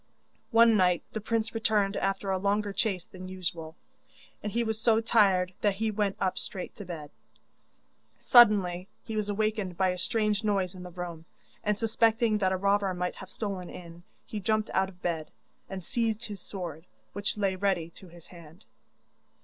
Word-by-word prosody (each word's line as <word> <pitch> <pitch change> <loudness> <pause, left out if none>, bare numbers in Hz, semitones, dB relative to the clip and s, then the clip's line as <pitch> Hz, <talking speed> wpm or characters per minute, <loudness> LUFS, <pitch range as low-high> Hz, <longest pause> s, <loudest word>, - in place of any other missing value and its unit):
One 230 -1 +6
night 180 -3 +3
the 220 - -3
prince 225 +1 -1
returned 210 -3 +1
after 195 0 -1
a 190 - +1
longer 205 +1 0
chase 190 -4 -1
than 185 0 -10
usual, 170 -3 -5 0.7
and 210 - -3
he 235 +2 +1
was 220 -1 -2
so 225 -1 +4
tired 195 -5 +3
that 205 -2 +2
he 220 +2 0
went 205 -2 0
up 190 -1 0
straight 185 - -6
to 205 - -7
bed. 155 -4 -7 1.1
Suddenly 195 -7 +5 0.2
he 220 - -5
was 210 -1 -1
awakened 210 -3 -1
by 190 -1 +3
a 180 0 -2
strange 210 0 +1
noise 195 -3 +1
in 185 - -10
the 180 - -7
room, 170 -2 -7 0.4
and 210 -1 +1
suspecting 225 0 +2
that 190 -2 +2
a 190 - +1
robber 200 0 +2
might 180 0 -2
have 190 - -9
stolen 195 -4 -4
in, 170 -1 -10 0.2
he 215 - -5
jumped 215 +2 0
out 190 0 +2
of 180 -2 -18
bed, 160 -3 -2 0.4
and 190 -2 -6
seized 225 +2 -1
his 205 -4 -7
sword, 175 -4 -7 0.3
which 205 +1 -2
lay 195 -2 +1
ready 185 -4 0
to 185 - -14
his 170 -1 -15
hand. 170 -1 -15
195 Hz, 180 wpm, -29 LUFS, 180-215 Hz, 1.1 s, One